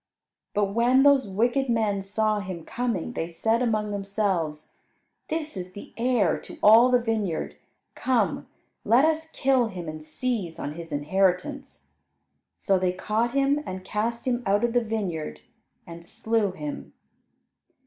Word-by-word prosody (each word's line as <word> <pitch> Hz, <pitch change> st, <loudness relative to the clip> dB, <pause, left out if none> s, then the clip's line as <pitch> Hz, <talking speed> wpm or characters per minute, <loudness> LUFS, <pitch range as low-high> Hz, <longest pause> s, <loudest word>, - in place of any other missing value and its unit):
But 200 Hz, -1 st, +1 dB
when 245 Hz, +4 st, +4 dB
those 280 Hz, -6 st, +4 dB
wicked 240 Hz, +7 st, +1 dB
men 215 Hz, -4 st, +1 dB
saw 215 Hz, +2 st, 0 dB
him 185 Hz, -4 st, -6 dB
coming, 235 Hz, -8 st, -2 dB
they 165 Hz, -, -3 dB
said 225 Hz, +7 st, 0 dB
among 215 Hz, -3 st, 0 dB
themselves, 195 Hz, -6 st, -2 dB, 0.5 s
"This 315 Hz, -4 st, -3 dB
is 185 Hz, -1 st, -6 dB
the 205 Hz, -, -11 dB
heir 235 Hz, -5 st, +2 dB
to -, -, -11 dB
all 225 Hz, +4 st, +8 dB
the 250 Hz, -, +5 dB
vineyard; 220 Hz, -8 st, -2 dB, 0.4 s
come, 255 Hz, -2 st, 0 dB, 0.4 s
let 250 Hz, +6 st, +5 dB
us 320 Hz, 0 st, 0 dB
kill 265 Hz, -5 st, +2 dB
him 180 Hz, -5 st, -7 dB
and 155 Hz, 0 st, -6 dB
seize 200 Hz, -3 st, -3 dB
on 145 Hz, -, -4 dB
his 165 Hz, 0 st, -9 dB
inheritance." 190 Hz, -, -1 dB, 0.7 s
So 195 Hz, -2 st, +1 dB
they 180 Hz, -1 st, +1 dB
caught 220 Hz, +5 st, -1 dB
him, 275 Hz, +1 st, +2 dB
and 185 Hz, -7 st, -7 dB
cast 230 Hz, +5 st, -2 dB
him 250 Hz, -1 st, 0 dB
out 205 Hz, +1 st, +2 dB
of 240 Hz, -1 st, +1 dB
the 245 Hz, -1 st, +3 dB
vineyard, 175 Hz, -, -3 dB, 0.4 s
and 170 Hz, 0 st, -10 dB
slew 220 Hz, +3 st, 0 dB
him. 150 Hz, -5 st, -7 dB
215 Hz, 150 wpm, -26 LUFS, 185-240 Hz, 0.7 s, all